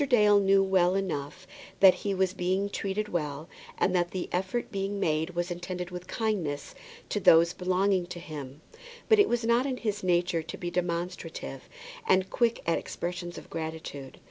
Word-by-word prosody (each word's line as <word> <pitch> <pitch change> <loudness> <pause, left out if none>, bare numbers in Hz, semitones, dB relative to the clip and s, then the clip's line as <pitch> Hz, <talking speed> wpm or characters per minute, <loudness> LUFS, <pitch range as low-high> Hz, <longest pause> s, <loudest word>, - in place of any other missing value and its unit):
Dale 210 -5 +6
knew 195 0 +4
well 185 -1 +3
enough 185 -2 -3 0.3
that 190 -2 +8
he 200 -1 -3
was 190 -1 +1
being 190 +2 -1
treated 200 +2 -2
well, 150 -2 -3 0.3
and 185 - +2
that 175 -1 +2
the 185 -1 -4
effort 190 +6 -2
being 195 0 -2
made 160 -1 0
was 175 +1 -1
intended 175 0 -5
with 180 0 -7
kindness 185 -11 -2 0.4
to - - 0
those 170 +1 +6
belonging 185 0 +1
to 175 -1 -7
him; 150 -4 -8 0.5
but 440 -2 +5
it 410 - +5
was 240 -1 0
not 235 +3 +3
in 260 -2 -2
his 210 -4 -3
nature 175 -2 +2
to 160 +1 -8
be 175 -1 -4
demonstrative 175 -1 -4 0.4
and 190 0 +3
quick 235 -1 +1
at 165 - +2
expressions 175 0 -5
of - - -10
gratitude. 160 -4 -6
180 Hz, 170 wpm, -28 LUFS, 170-195 Hz, 0.5 s, that